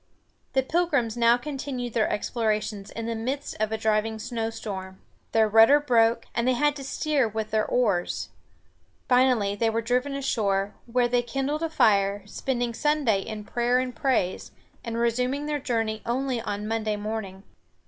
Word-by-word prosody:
The 265 -1 +3
Pilgrims 285 -7 +1
now 235 0 +4
continued 260 -2 -5
their 220 -2 +2
explorations 210 -2 -2
in 230 - -6
the 230 - -2
midst 260 +6 -3
of 215 0 0
a 220 - -1
driving 220 0 0
snowstorm. 220 -5 -5 0.3
Their 220 -1 +4
rudder 225 +7 +7
broke, 230 -4 +2
and 235 +1 0
they 255 - +4
had 295 +3 +2
to 275 - -7
steer 280 -2 0
with 220 0 -4
their 215 0 +1
oars. 205 -8 0 0.8
Finally 250 -6 +3
they 225 +1 +2
were 225 +1 -1
driven 250 +4 0
ashore, 205 -7 0 0.2
where 245 0 +3
they 245 0 +2
kindled 270 +5 -2
a 330 - -1
fire, 205 -8 +3
spending 240 +2 -2
Sunday 285 -6 +1
in 215 +1 -6
prayer 240 +3 +1
and 255 -1 -2
praise, 230 -10 0 0.3
and 230 -1 -4
resuming 250 +5 0
their 300 -1 -1
journey 225 -4 -1
only 250 0 -1
on 205 -2 -4
Monday 220 -1 -1
morning. 205 -2 -5
230 Hz, 160 wpm, -26 LUFS, 215-255 Hz, 0.8 s, rudder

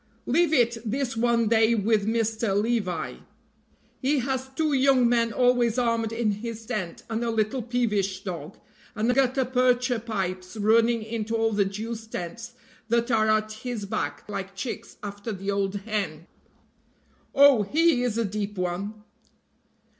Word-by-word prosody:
"Leave 325 +5 +2
it 240 -5 +3
this 245 +2 -2
one 235 0 +2
day 225 +1 +4
with 210 -1 +1
Mr. 225 -2 +1
Levi; 205 -6 -1 0.8
he 285 +2 +2
has 260 0 -1
got 265 0 -23
two 310 -2 +1
young 265 -2 +4
men 235 -1 +2
always 245 -1 +2
armed 230 -2 +1
in 225 -2 0
his 225 +2 -6
tent, 210 -8 -4
and 225 +1 -2
a 235 - -1
little 225 +3 0
peevish 210 -5 -1
dog, 175 -2 -6 0.4
and 225 +3 +1
gutta 260 0 +2
percha 250 -1 +2
pipes 190 -3 -4
running 225 +2 +3
into 225 0 -3
all 225 0 +2
the 205 -2 +2
Jews' 220 +3 -5
tents 225 +5 -6 0.3
that 235 +2 +1
are 220 -1 +3
at 215 0 +2
his 220 -1 -5
back 145 -7 -3
like 195 -1 -5
chicks 225 +5 -6
after 205 +2 -5
the 195 0 -3
old 200 0 -1
hen." 200 -6 -3 1.1
"Oh, 280 -4 +7
he 305 - +3
is 240 -3 -1
a 230 - +1
deep 205 0 -4
one." 195 +4 -3
225 Hz, 155 wpm, -26 LUFS, 205-245 Hz, 1.1 s, Oh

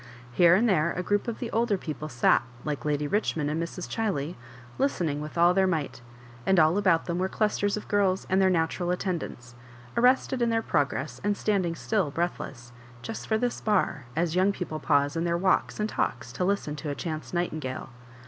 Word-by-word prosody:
Here 170 +6 +6
and 225 +5 +3
there 170 -5 +2
a 180 - -3
group 205 +4 0
of 235 - -3
the 240 - -5
older 225 -3 +1
people 155 -3 -6
sat, 125 -3 +3 0.2
like 150 -1 -3
lady 150 -1 0
Richmond 150 -5 0
and 160 +2 -1
Mrs. 170 +1 -5
Chiley, 180 -9 -2 0.5
listening. 170 - 0
with 150 +2 -7
all 175 +1 +5
their 190 0 +3
might; 145 -8 -2 0.4
and 190 +4 +3
all 160 +5 +4
about 185 -5 +3
them 170 0 -2
were 185 - +1
dusters 205 0 0
of 210 - -7
g^rls 195 -2 +1
and 190 +1 +2
their 190 - +5
natural 175 0 0
attendants, 175 -10 -3 0.4
arrested 250 +1 +3
in 235 - +3
their 225 0 +1
pro 145 - +2
gress, 140 +1 -6
and 205 0 +1
standing 185 -5 0
still 200 -3 0
breathless, 140 -6 -4 0.3
''just 225 - -6
for 220 - +2
this 245 +1 -2
bar," 185 - +1
as 165 +1 0
young 190 +2 +4
people 175 -5 -5
pause 145 -1 +2
in 165 - 0
their 170 0 +1
walks 185 +3 +1
and 210 - +1
talks - - -2
to - - -2
listen 185 -6 0
to 150 0 -5
a 145 - -2
chance 155 +1 -5
nightingale. 155 -7 -3
175 Hz, 200 wpm, -27 LUFS, 155-205 Hz, 0.5 s, Here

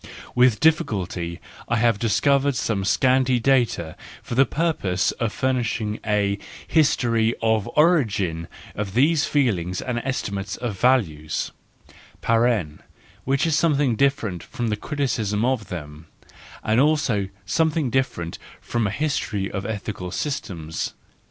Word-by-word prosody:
With 125 -3 +4
difficulty 95 - 0 0.3
I 120 - +2
have 115 -2 +2
discovered 135 +5 +2
some 105 -5 -1
scanty 130 +3 +3
data 120 -11 +1 0.3
for - - -6
the 130 +2 +4
purpose 150 - 0
of 115 -3 0
furnishing 120 -5 -1
a 100 -1 +1 0.3
history 115 -7 +2
of 110 -2 +1
the - - -6
origin 105 - +2 0.3
of 100 -1 -4
these 145 +4 +4
feelings 95 - 0
and 125 -2 -2
estimates 105 -6 -3
of 110 -6 -4
value 95 - +2 2.0
(which 135 +4 +1
is 160 -2 +2
something 145 -6 +2
different 115 - 0
from 120 +1 -4
a - - +1
criticism 115 -5 -1
of 125 -6 0
them, 75 -3 -8 0.6
and 110 +2 +2
also 135 -10 +2 0.2
something 155 +3 +1
differ¬ 130 -8 0
ent 85 - -7 0.2
from 120 -3 -1
a - - -1
history 110 -6 -2
of 100 0 -4
ethical 100 -4 -4
systems). 85 - -4
115 Hz, 125 wpm, -23 LUFS, 100-135 Hz, 2.0 s, With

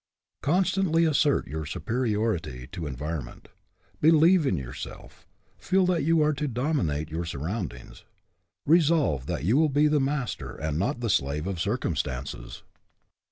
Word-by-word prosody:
Constantly 175 0 +2
assert 150 -2 +2
your 80 +2 -5
superiority 105 - -2
to 85 -5 -5
environment. 75 0 -6 0.5
Believe 160 +1 +5
in 95 - +1
yourself; 65 +6 -9 0.3
feel 185 - +2
that 175 -4 +1
you 165 0 +3
are 150 0 +2
to 150 +1 -2
dominate 120 - -1
your 80 +2 -2
surroundings. 80 - -5 0.6
Re 165 +4 +6
solve 145 - +1
that - - -3
you 110 - +3
will 155 0 +4
be 145 +2 +3
the 150 0 +2
master 135 -2 -2
and 75 0 -2
not 120 +6 -1
the 115 - -1
slave 70 +2 0
of 95 -3 -3
circumstances. 70 - -3
115 Hz, 140 wpm, -27 LUFS, -, 0.6 s, Re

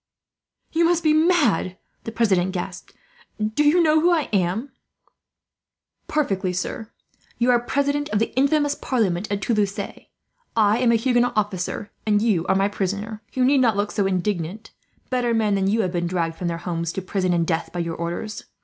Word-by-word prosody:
"You 330 +1 +2
must 340 0 +2
be 310 -1 +4
mad," 310 - +2 0.3
the 225 - -4
president 190 -5 +1
gasped. 180 0 -6 0.5
"Do 215 +7 0
you 325 +4 +4
know 315 -1 +4
who 345 - +4
I 330 -5 +1
am?" 195 +8 0 1.4
"Perfectly, 195 -11 0
sir. 200 +4 -4 0.5
You 245 +1 +3
are 240 - +4
president 285 +4 -1
of 210 - 0
the 225 - -1
infamous 290 +2 +2
parliament 210 -9 -1
of 200 0 -1
Toulouse. 205 -2 0
I 225 - -2
am 245 -2 +3
a - - +4
Huguenot 245 +1 +2
officer, 205 -1 -2 0.2
and 210 -1 +3
you 200 -6 +1
are 190 - +3
my 195 +1 +3
prisoner. 205 +2 -3
You 255 -1 +2
need 275 +1 +4
not 225 -5 +3
look 205 +1 0
so 200 -2 0
indignant; 190 +2 -2 0.4
better 245 -2 +1
men 215 -2 +2
than 195 -1 +1
you 220 +3 +2
have 185 -4 -1
been 175 -1 -1
dragged 170 -2 -1
from 175 - -4
their 170 -1 -2
homes, 170 -1 -3
to 190 - -4
prison 185 -1 -1
and 170 -1 +1
death, 165 -1 -1
by 175 - -3
your 165 -1 -3
orders. 175 +6 -5
210 Hz, 185 wpm, -23 LUFS, 185-250 Hz, 1.4 s, be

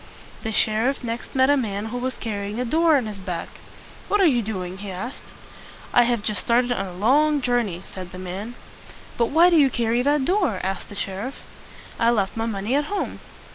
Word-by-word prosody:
The 220 - -3
sheriff 225 +6 +1
next 235 +2 -5
met 260 +1 +5
a - - +5
man 210 -6 -2
who - - -2
was 255 0 -3
carrying 205 0 -4
a 250 - 0
door 320 +4 +4
on 255 - -1
his 210 -2 -6
back. 180 -3 -4 0.6
"What 415 - +2
are 390 - +5
you 255 -7 +4
doing?" 190 -4 -5
he 205 0 -6
asked. 195 +8 -6 0.7
"I 245 -1 +6
have 235 -3 0
just 210 -3 -1
started 245 +1 +2
on 195 -5 -1
a 180 - -8
long 285 +10 +3
jour 245 -2 +2
ney," 185 -5 -5
said 185 -2 -8
the - - -9
man. 190 +6 -6 0.6
"But 235 - +2
why 335 +6 +5
do 335 - +5
you 280 -3 +6
carry 235 -1 +1
that 285 +1 +2
door?" 365 - +1
asked 190 +1 -3
the 205 - -9
sheriff. 200 +7 -4 0.6
"I 230 - +4
left 205 -5 +1
my 225 0 -1
money 210 +2 -2
at 290 +1 +2
home." 405 +6 -3
230 Hz, 215 wpm, -23 LUFS, 200-265 Hz, 0.7 s, I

